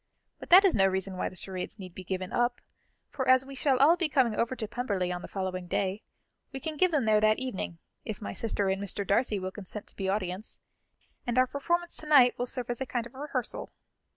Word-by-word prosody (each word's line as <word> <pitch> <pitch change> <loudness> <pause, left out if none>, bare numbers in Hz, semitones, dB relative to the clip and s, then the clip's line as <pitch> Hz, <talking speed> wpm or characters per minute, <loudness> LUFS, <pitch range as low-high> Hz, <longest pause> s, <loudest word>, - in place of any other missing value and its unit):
But - - -10
that 375 +3 +9
is 380 - +5
no 195 -2 +4
reason 190 0 -2
why - - -2
the - - -14
charades 185 +2 -4
need 185 -4 -9
be 185 - -8
given 185 0 -4
up, 240 0 +1 0.5
for 260 -2 -3
as 260 0 +5
we 275 - -9
shall 270 0 +2
all 290 +6 +6
be 345 -3 0
coming 255 -6 +2
over 235 +4 0
to 225 -3 -4
Pemberley 205 -6 -2
on 175 0 -4
the - - -8
following 185 -2 -4
day, 195 +3 -1 0.5
we 270 - -5
can 310 +3 -4
give 365 +5 +3
them 295 -8 +1
there 215 -1 +4
that 215 0 +4
evening, 250 -9 -4 0.3
if 215 -3 -5
my 210 - -5
sister 205 -3 0
and 190 +1 -1
Mr. 200 0 -2
Darcy 210 +2 +2
will 185 0 -4
consent 205 +1 -8
to - - -15
be 190 -1 -2
audience, 190 +1 -3 0.7
and 240 +1 -1
our 255 - +6
performance 345 +6 -1
to 310 - -9
night 265 -5 +7
will 245 - -1
serve 245 -1 -3
as 240 - -5
a - - 0
kind 240 -2 -2
of 240 - -12
rehearsal." 290 +3 -3
225 Hz, 235 wpm, -29 LUFS, 190-260 Hz, 0.7 s, that